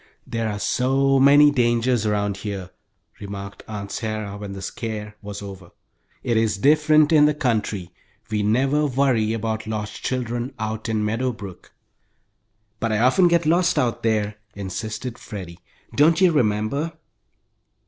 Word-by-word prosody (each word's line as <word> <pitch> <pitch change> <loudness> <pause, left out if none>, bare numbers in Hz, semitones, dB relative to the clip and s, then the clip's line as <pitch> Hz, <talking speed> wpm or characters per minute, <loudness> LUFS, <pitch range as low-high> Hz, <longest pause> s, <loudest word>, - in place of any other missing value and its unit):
"There 115 -1 -2
are 105 - -3
so 135 +5 +2
many 145 +2 +7
dangers 120 -3 +1
around 105 -1 0
here," 100 -2 -6 0.5
remarked 100 0 -7
Aunt 100 -2 -6
Sarah, 110 -2 -4
when 100 0 -7
all 100 - -7
the 95 - -7
"scare" 105 0 -5
was 100 0 -7
over. 95 -3 -9 0.5
"It 115 -2 +1
is 110 -3 +1
different 150 +4 +4
in 150 -1 +7
the 150 - +1
country. 110 - -1 0.4
We 105 -1 0
never 135 +8 +2
worry 125 -5 +1
about 110 0 -3
lost 105 -1 -4
children 125 +1 -3
out 110 0 -4
in 110 -1 0
Meadow 120 +4 0
Brook." 100 -5 -11 1.1
"But 115 - -1
I 110 - +1
often 130 - +4
got 170 -1 +2
lost 175 +2 +2
out 125 -5 0
there," 105 -2 0 0.2
insisted 110 +5 -5
Freddie. 90 -6 -8 0.4
"Don't 160 +3 +4
you 185 -2 +5
remember?" 130 +4 0
110 Hz, 150 wpm, -23 LUFS, 105-135 Hz, 1.1 s, many